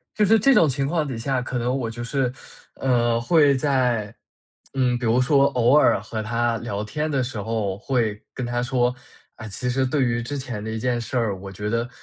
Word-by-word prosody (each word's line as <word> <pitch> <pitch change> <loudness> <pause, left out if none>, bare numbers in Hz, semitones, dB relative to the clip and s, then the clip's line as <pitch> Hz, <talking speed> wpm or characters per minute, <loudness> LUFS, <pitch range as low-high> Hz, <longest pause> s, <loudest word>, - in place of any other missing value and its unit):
就 210 - +2
是 220 +3 +5
这 275 +6 +4
种 165 -9 +5
情 135 +1 -1
况 160 -1 0
底 130 -4 -4
下， 130 +2 -1
可 125 0 -4
能 125 +2 0
我 120 -4 -2
就 120 +1 -6
是， 125 0 -1 0.4
呃， 120 -3 +1
会 145 +3 +4
在， 125 -6 0 0.6
嗯， 125 -2 +2
比 120 - -3
如 115 +3 +3
说 140 +2 +4
偶 125 -1 +3
尔 150 - +5
和 110 +1 -5
她 115 +1 0
聊 105 -3 -4
天 150 +9 -3
的 135 -3 0
时 120 -4 -4
候， 110 -3 -2
会 110 -4 -1
跟 125 - -4
她 120 0 -1
说， 125 0 +1 0.4
啊， 110 - -9
其 125 +5 -3
实 135 +1 +1
对 135 +1 +1
于 120 -1 0
之 145 +5 -4
前 125 -5 -5
的 110 - -5
一 110 - -3
件 120 +1 -1
事 125 +2 -3
儿， 110 -4 0
我 95 0 -8
觉 105 +2 -5
得 115 +2 -1
120 Hz, 240 characters per minute, -23 LUFS, 115-135 Hz, 0.6 s, 是